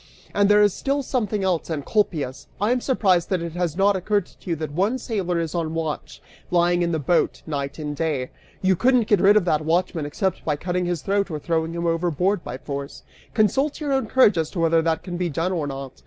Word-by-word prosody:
And 205 0 +3
there 210 0 +6
is 205 -2 +3
still 280 +1 -1
something 215 -6 -1
else, 180 -4 0
Encolpius. 150 - -1
I 210 +4 +1
am 250 0 +1
surprised 190 -10 +2
that 185 -3 0
it 170 - -4
has 175 -1 -2
not 200 +1 +4
occurred 200 +1 0
to - - -14
you 170 - +1
that 155 -1 -5
one 195 - +1
sailor 195 -8 -2
is 165 -2 -3
on 165 -2 -2
watch, 160 -2 -4 0.3
lying 175 0 +3
in 170 0 +1
the 160 - 0
boat, 160 +4 +1
night 140 -3 -4
and 150 -2 -4
day. 145 -5 -2 0.3
You 190 0 +4
couldn't 250 +3 +3
get 205 -4 +3
rid 205 +2 +6
of 200 - +2
that 155 -3 +1
watchman 165 -1 0
except 190 +5 -2
by 150 - 0
cutting 180 +4 -2
his 175 -5 -2
throat 200 0 0
or 155 - -3
throwing 160 +1 -1
him 170 0 -3
overboard 170 +3 0
by 125 - -6
force. 140 0 -6 0.3
Consult 265 +7 +2
your 290 -3 -1
own 265 -4 0
courage 215 -8 +4
as 160 -1 -1
to 185 - -5
whether 165 0 +3
that 160 -1 0
can 175 -2 -5
be 175 -1 -1
done 165 +4 -1
or 165 -5 -1
not. 135 -1 -6
175 Hz, 230 wpm, -23 LUFS, 160-200 Hz, 0.3 s, there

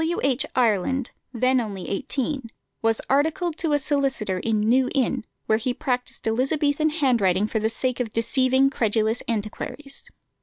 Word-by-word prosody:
W. 335 +2 0
H. 265 -3 +2
Ireland, 245 +2 +1 0.2
then 255 +1 +2
only 200 -5 -5
eighteen, 265 +4 -2 0.3
was 225 0 +1
articled 315 +4 +1
to 320 -3 0
a - - +5
solicitor 270 -9 0
in 215 +1 0
New 250 +4 +3
Inn, 255 -3 +1 0.2
where 220 0 +2
he 245 +2 -2
practised 250 -2 -3
Elizabethan 285 +6 +1
handwriting 230 - +2
for 220 - -1
the 220 +1 +1
sake 250 +2 -1
of 235 -3 -2
deceiving 260 +4 +2
credulous 220 -1 +1
antiquaries. 235 +6 -5
250 Hz, 150 wpm, -24 LUFS, 220-275 Hz, 0.3 s, a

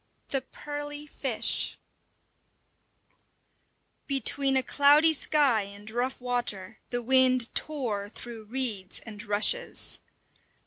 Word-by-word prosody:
V: 270 - +1
THE - - -18
PEARLY 290 +2 -7
FISH 270 -5 -1 2.3
Between 275 0 +3
a 260 - +2
cloudy 295 +5 +5
sky 280 -6 +2
and 200 +2 -10
rough 245 +3 -2
water 245 -6 -3
the 245 -1 -3
wind 255 -1 +4
tore 230 -10 -2
through 225 0 -9
reeds 220 -6 -1
and 210 -2 -10
rushes. 215 - 0
255 Hz, 100 wpm, -28 LUFS, 220-280 Hz, 2.3 s, cloudy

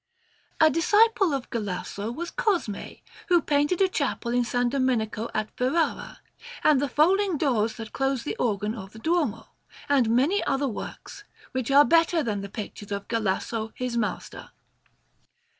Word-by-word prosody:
A 315 - +7
disciple 410 - +3
of 275 -3 -3
Galasso 205 0 -4
was 340 +8 -5
Cosmè, 395 - -2 0.2
who 350 -2 +5
painted 295 +4 +1
a 385 - +5
chapel 280 -8 -2
in 245 - +3
S. 235 - -6
Domenico 245 -3 0
at 215 0 -3
Ferrara, 275 +7 -1 0.4
and 295 -3 +4
the 285 - -1
folding 365 +6 +3
doors 230 -7 +1
that 225 -1 -8
close 270 -3 0
the - - -3
organ 210 -2 -1
of 195 -3 -9
the - - -12
Duomo, 315 -3 -1 0.4
and 270 -5 +3
many 275 - +2
other 275 +1 0
works, 330 - -7 0.3
which 260 -2 -3
are 285 +1 +7
better 330 -1 +3
than 210 -5 -2
the 200 - -7
pictures 205 -1 -8
of 200 0 -4
Galasso, 220 0 -2
his 250 -1 -3
master. 225 -3 -3
255 Hz, 155 wpm, -26 LUFS, 220-320 Hz, 0.4 s, A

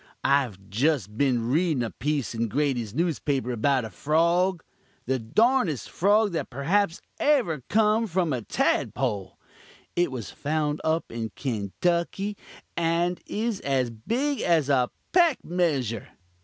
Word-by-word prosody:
I've 135 -8 +2
jest 115 - 0
been 120 -3 +1
readin' 155 -4 +2
a 115 - -3
piece 145 -2 -2
in 115 0 -1
Grady's 125 -4 -1
newspaper 145 -6 0
about 125 +2 +1
a 110 - -8
frog 170 - +1 0.4
the 130 +1 0
darndest 200 - +1
frog 205 +3 +3
that 165 - -3
perhaps 165 +7 0 0.2
ever 240 - +2
come 220 +2 +3
from 175 -4 0
a 125 - -2
tadpole. 100 -2 -1 0.6
It 175 -4 +2
was 120 -6 -6
found 150 0 -1
up 160 +1 0
in 115 -1 -4
Kanetucky, 170 - -1 0.4
and 170 +1 0
is 220 -1 -2
as 130 -3 0
big 245 - -1
as 160 -5 +2
a 125 -3 +3 0.2
peck 340 -6 +3
measure. 140 - 0
150 Hz, 130 wpm, -26 LUFS, 125-180 Hz, 0.6 s, frog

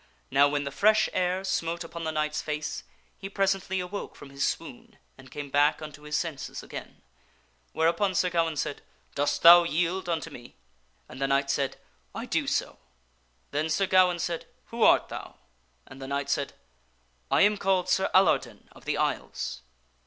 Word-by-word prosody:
Now, 140 +2 +5
when 145 0 -1
the 140 - -4
fresh 215 +8 +3
air 185 +1 0
smote 170 -2 -2
upon 165 0 -7
the 160 - -1
knight's 155 0 -1
face, 150 0 -4 0.4
he 195 - -6
presently 195 -1 0
awoke 180 +3 -5
from 140 - -12
his 140 0 -3
swoon 230 - -4 0.2
and 135 -1 -15
came 145 -2 -7
back 145 +2 +3
unto 150 -2 -9
his 150 0 -4
senses 160 -6 -4
again, - - -9 0.7
whereupon 170 +4 +1
Sir 180 0 +2
Gawaine 165 -2 +1
said, 145 - -3 0.3
"Dost 145 0 -1
thou 175 +1 +11
yield 175 +2 -1
unto 165 -1 -2
me?" 120 -3 -12 0.5
And 130 - -11
the 135 - +2
knight 140 0 +1
said, 140 -1 -1 0.2
" - - -30
I - - -4
do - - -1
so." - - -1 0.7
Then 150 +2 -1
Sir 195 +5 +2
Gawaine 185 -1 +4
said, 170 0 -3
" - - -39
Who 230 0 -5
art - - +5
thou?" - - -8 0.5
And 135 - -13
the 135 - -6
knight 140 0 -2
said, 140 - -1 0.4
" - - -40 0.3
I - - +3
am 210 +1 +4
called 190 -2 +1
Sir 190 +1 +2
Alardin 190 +1 +2
of - - -17
the - - -1
Isles." 65 -1 -2
165 Hz, 180 wpm, -27 LUFS, 145-185 Hz, 0.7 s, thou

